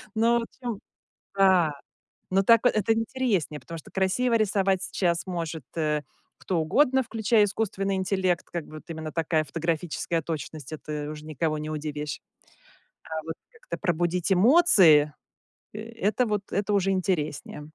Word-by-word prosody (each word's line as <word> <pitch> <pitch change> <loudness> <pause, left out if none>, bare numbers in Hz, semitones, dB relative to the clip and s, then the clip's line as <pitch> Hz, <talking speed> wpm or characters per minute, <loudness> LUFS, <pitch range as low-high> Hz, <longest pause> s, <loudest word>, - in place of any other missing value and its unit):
Ну, 235 +2 +3
в - - -2
общем 235 -3 -6 0.6
Да. 185 -5 +4 0.6
Ну, 195 +1 +3
так 230 +2 +6
это 215 -2 +3
интереснее, 225 - -1
потому 165 +6 -8
что - - -13
красиво 215 +6 +1
рисовать 195 -3 +2
сейчас 175 -3 0
может, 165 -4 -4
э, 150 -2 0 0.4
кто 180 -3 -2
угодно, 265 - +3
включая 220 -1 +2
искусственный 195 -1 -1
интеллект, 185 -2 0
как 170 -3 -4
бы 155 - -13
вот - - -9
именно 160 -1 -6
такая 160 -1 0
фотографическая 165 +2 -2
точность- 155 -1 -6
это 150 -1 -5
уже 155 0 -8
никого 155 0 -2
не 155 +1 -5
удивишь. 150 -1 -4 0.8
А 160 -1 -5
вот 160 - -4 0.2
как-то 475 +1 -8
пробудить 175 0 0
эмоции- 185 - +6 0.6
это 225 +2 -1
вот, 210 -2 -1
это 205 +1 0
уже 195 -1 +2
интереснее. 155 -5 -2
180 Hz, 140 wpm, -26 LUFS, 155-210 Hz, 0.8 s, так